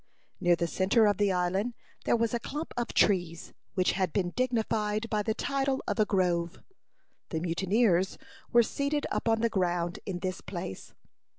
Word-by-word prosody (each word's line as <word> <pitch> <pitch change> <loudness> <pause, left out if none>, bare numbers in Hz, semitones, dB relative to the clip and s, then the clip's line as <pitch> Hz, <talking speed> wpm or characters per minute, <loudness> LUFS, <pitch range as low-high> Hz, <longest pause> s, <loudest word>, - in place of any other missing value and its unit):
Near 175 0 +4
the 170 - -1
centre 195 +6 +3
of 205 -2 +3
the 205 -1 +2
island 190 +6 0 0.3
there - - +3
was 230 -1 0
a 235 - +1
clump 300 +7 -5
of 240 -1 -1
trees, 175 -5 +1 0.2
which 185 -1 +3
had 185 -3 0
been 180 -1 0
dignified 225 -3 0
by 210 -1 +1
the 220 +1 -1
title 275 -1 -1
of - - -1
a 215 - +5
grove. 175 -3 0 0.7
The 160 - -2
mutineers 190 +2 +1 0.3
were 235 0 +6
seated 280 +5 -1
upon 225 -1 +1
the 230 - +3
ground 175 -3 -1
in 190 -3 -2
this 185 +1 -4
place. 170 - -7
200 Hz, 170 wpm, -29 LUFS, 175-230 Hz, 0.7 s, were